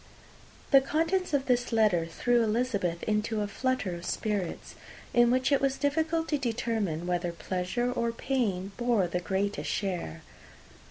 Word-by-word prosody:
The 275 -2 +8
contents 330 +6 0
of 280 -2 +1
this 245 -1 +1
letter 210 -7 +3
threw 240 +8 +1
Elizabeth 210 -6 0
into 215 0 0
a 205 - -1
flutter 255 -2 -1
of 170 0 -7
spirits, 200 -3 -3 0.4
in 240 0 +5
which 255 +3 +2
it 280 - +3
was 275 -1 +1
difficult 320 +3 0
to 295 - +1
determine 225 - -1
whether 175 -1 -1
pleasure 185 +8 -2
or 235 -1 0
pain 225 -7 -1
bore 240 -5 +2
the 175 +1 -2
greatest 195 +3 -2
share. 175 - -3
225 Hz, 150 wpm, -29 LUFS, 185-260 Hz, 0.4 s, The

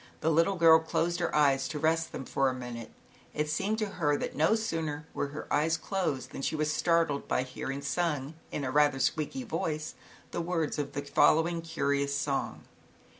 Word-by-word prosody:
The 160 - +2
little 165 +5 +3
girl 165 -2 +7
closed 170 +2 -1
her 170 - -1
eyes 135 -3 +3
to 150 - -4
rest 160 +2 +1
them 135 - -6
for 135 +1 +1
a 130 - -3
minute. 120 -2 -7 0.5
It 150 0 -1
seemed 200 +7 0
to 215 - 0 0.2
her 145 -1 +3
that - - -4
no 160 +8 +3
sooner 160 -9 -3
were - - -1
her 145 +2 -7
eyes 160 +2 +2
closed 160 - -2
than - - -6
she 145 - -1
was 155 0 0
startled 165 -4 +1
by 125 - +1
hearing, 135 +2 -5
sung 145 -1 -1 0.2
in 145 - -3
a 130 - -2
rather 145 -1 +4
squeaky 155 - -1
voice, 155 -9 -3 0.4
the - - -2
words 165 -3 -1
of 140 -1 -3
the 145 - -3
following 160 +4 +3
curious 140 -3 0
song 140 -2 -2
150 Hz, 190 wpm, -30 LUFS, 140-165 Hz, 0.5 s, girl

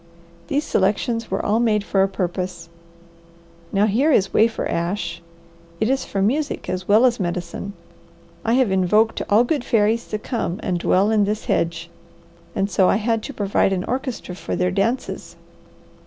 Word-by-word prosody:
These 290 +2 0
selections 225 +3 0
were - - -2
all 215 +2 +2
made 215 -3 +2
for 195 -1 +1
a 195 - +4
purpose. 180 -2 -4 1.0
Now 200 +1 +3
here 245 +9 +2
is 195 -8 +2
wafer 225 +1 +2
ash; 170 0 -2 0.6
it 220 +4 +1
is 270 - 0
for 195 -1 -1
music 285 +8 -1
as 185 0 -3
well 215 +5 +5
as 245 -2 +2
medicine. 175 +2 -4 0.7
I 230 - +1
have 250 -5 +3
invoked 200 +4 +2
all 210 +3 +5
good 275 +1 -1
fairies 225 0 +1
to 215 - -2
come 210 -5 -3
and 175 -1 -1
dwell 195 +5 +2
in 210 -2 +3
this 210 +2 -2
hedge, 170 0 -1 0.7
and 195 -2 +1
so 190 -2 +3
I - - +3
had 225 +1 0
to - - -6
provide 200 -1 +1
an 180 -1 -1
orchestra 255 -6 -4
for 180 - -4
their 180 0 +1
dances. 215 +7 -2
205 Hz, 170 wpm, -21 LUFS, 185-230 Hz, 1.0 s, well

